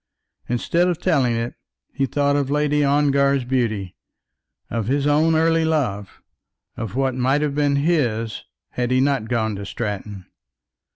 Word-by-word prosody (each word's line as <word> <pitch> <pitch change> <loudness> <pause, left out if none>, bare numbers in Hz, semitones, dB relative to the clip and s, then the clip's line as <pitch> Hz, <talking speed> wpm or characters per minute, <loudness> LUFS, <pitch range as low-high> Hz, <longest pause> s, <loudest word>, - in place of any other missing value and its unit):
Instead 170 +9 +1
of 175 -2 0
telling 140 -10 +1
it 115 +1 -3 0.4
he 135 - 0
thought 145 0 +1
of 140 -2 0
Lady 150 0 +1
Ongar's 140 -2 +2
beauty, 110 -8 -1 0.7
of 115 -3 -3
his 140 +2 0
own 155 +2 +3
early 165 +1 +3
love, 125 -12 -2 0.5
of 115 -3 -5
what 135 -1 +1
might 130 +4 +1
have 145 -2 -1
been 145 -1 +1
his 130 -8 0 0.3
had 125 -1 -2
he 130 0 +2
not 135 -4 +1
gone 110 -3 0
to 100 - -6
Stratton. 100 -2 -5
135 Hz, 150 wpm, -21 LUFS, 115-145 Hz, 0.7 s, own